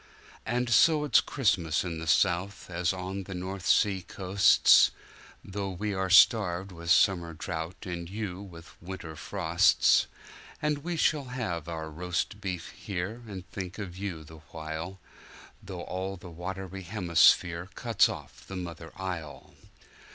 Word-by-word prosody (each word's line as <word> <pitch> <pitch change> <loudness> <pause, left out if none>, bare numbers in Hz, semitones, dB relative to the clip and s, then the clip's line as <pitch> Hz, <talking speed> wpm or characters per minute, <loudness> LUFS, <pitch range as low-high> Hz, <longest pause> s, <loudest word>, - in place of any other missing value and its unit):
And 125 +2 0
so 150 +6 +5
it's 150 - +5
Christmas 90 - +1
in 85 -3 -4
the 80 - -6
South 95 +3 +1
as 85 -1 0
on 95 +1 -5
the 95 - -7
North 95 0 -5
sea 95 -2 +3
coasts, 95 +2 +5 0.6
Though 100 0 -4
we 100 +3 -3
are 95 -1 -1
staved 95 -1 +5
with 85 -1 -8
summer 85 -2 +3
drouth 85 +3 -5
and 85 -2 -5
you 100 -2 -5
with 85 -4 -13
winter 85 -3 -7
frosts. 85 +3 +3 0.5
And 150 -1 0
we 170 +3 -4
shall 150 -2 +2
have 110 - -4
our 80 -1 -5
roast 90 +5 -3
beef 90 -4 -4
here, 100 +5 -5
and 95 -4 -8
think 95 -1 -6
of 95 -5 -6
you 95 -5 -5
the 80 +1 -13
while, 80 +4 -6 0.6
Though 90 -2 -7
all 95 +1 -4
the 90 0 -11
watery 95 +3 -6
hemisphere 85 -2 +3
cuts 115 -4 +3
off - - -9
the 95 - -7
mother 85 -3 -7
isle. 85 -6 -6
95 Hz, 145 wpm, -29 LUFS, 85-100 Hz, 0.6 s, so